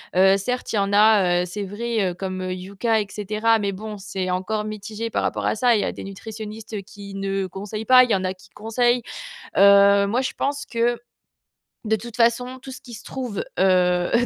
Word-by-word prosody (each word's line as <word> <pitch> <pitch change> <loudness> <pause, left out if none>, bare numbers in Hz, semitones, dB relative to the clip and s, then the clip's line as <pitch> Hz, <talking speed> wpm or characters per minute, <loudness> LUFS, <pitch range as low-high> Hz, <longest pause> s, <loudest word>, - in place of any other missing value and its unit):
Heu, 190 +1 +5
certes 250 +4 -3
il - - +1
y - - +3
en 195 0 0
a, 200 -4 +4
heu, - - -3
c'est 200 +4 -5
vrai, 210 0 -1
heu, - - -6
comme, 185 0 -4
heu, 185 0 -3
Yuka 200 +5 -1
et 205 - -5
cetera, 215 +2 +1
mais, 200 -1 -1
bon, 210 +2 -7
c'est 190 -2 -4
encore 210 +4 -2
mitigé 215 +1 -5
par - - 0
rapport - - -2
à - - +1
ça. 240 +1 +3
Il 210 - +1
y - - -1
a - - -1
des - - -9
nutritionnistes, 215 +2 -8
heu, 205 - -3
qui 200 -1 -11
ne 195 0 -2
conseillent 205 +4 -6
pas, 255 0 +8
il 250 - -1
y - - +5
en 190 - -2
a 185 - -1
qui 185 - -20
conseillent. 240 +3 0 0.5
Heu, 200 0 +6
moi 235 +6 +1
je 260 - -2
pense 285 +1 -2
que, 235 0 0 0.9
de 220 - +2
toute 235 +2 -9
façon, 245 +2 +1
tout 265 +1 -10
ce 255 - -10
qui 245 -3 -10
se 215 - -12
trouve 250 -6 -4 0.2
heu, 180 +4 +3
210 Hz, 225 wpm, -23 LUFS, 195-230 Hz, 0.9 s, pas